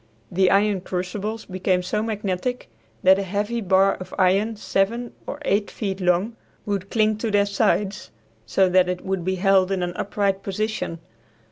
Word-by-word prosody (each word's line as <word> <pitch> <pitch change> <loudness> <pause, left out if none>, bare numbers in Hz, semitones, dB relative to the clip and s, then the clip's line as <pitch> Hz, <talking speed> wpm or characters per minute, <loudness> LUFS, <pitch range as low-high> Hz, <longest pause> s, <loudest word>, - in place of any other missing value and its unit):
The 185 +1 +3
iron 200 -1 +3
crucibles 195 +5 -4
became 185 -1 0
so 200 +4 -1
magnetic 215 - -3 0.3
that 190 +1 +6
a - - 0
heavy 205 +5 -2
bar 195 0 +3
of 185 0 -8
iron 200 +4 +2
seven 220 +4 -1
or - - -4
eight 205 +1 +1
feet 195 -3 -4
long 180 +6 +1 0.3
would 200 -2 -2
cling 215 -1 +2
to 225 - -1
their 205 -1 +3
sides, 200 -1 0 0.3
so 185 +12 +2
that 180 0 +3
it 180 0 -4
would 190 -2 -2
be 190 +2 0
held 190 0 +3
in 190 -2 0
an 175 0 -3
upright 200 0 -1
position. 205 -3 -3
195 Hz, 165 wpm, -23 LUFS, 185-210 Hz, 0.3 s, that